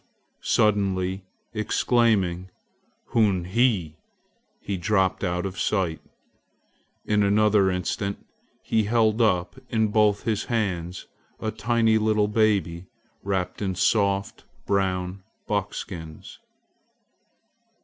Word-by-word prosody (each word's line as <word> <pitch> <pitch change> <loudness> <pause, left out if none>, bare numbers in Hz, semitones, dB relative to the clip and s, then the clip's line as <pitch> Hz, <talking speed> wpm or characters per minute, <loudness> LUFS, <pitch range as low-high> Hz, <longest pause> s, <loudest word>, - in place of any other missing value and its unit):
Suddenly 95 -3 +1 0.3
exclaiming 105 -5 +1 0.6
"Hunhe!" 100 -6 +2 1.1
he 100 - -4
dropped 95 -1 +1
out 90 0 -1
of 95 -1 -5
sight. 90 -6 0 1.1
In 105 0 +2
another 105 -1 +3
instant 95 +2 -2 0.5
he 110 -2 +1
held 110 0 +2
up 90 -5 +1
in 110 -2 +1
both 105 -1 +2
his 110 -2 -1
hands 95 -6 -2 0.3
a 110 - -2
tiny 110 +1 +2
little 110 -1 +2
baby, 100 -5 +1 0.3
wrapped 95 -2 -2
in 95 -2 -1
soft 100 0 +1 0.2
brown 95 -1 -1 0.2
buckskins. 95 -5 -5
100 Hz, 90 wpm, -25 LUFS, 95-110 Hz, 1.1 s, another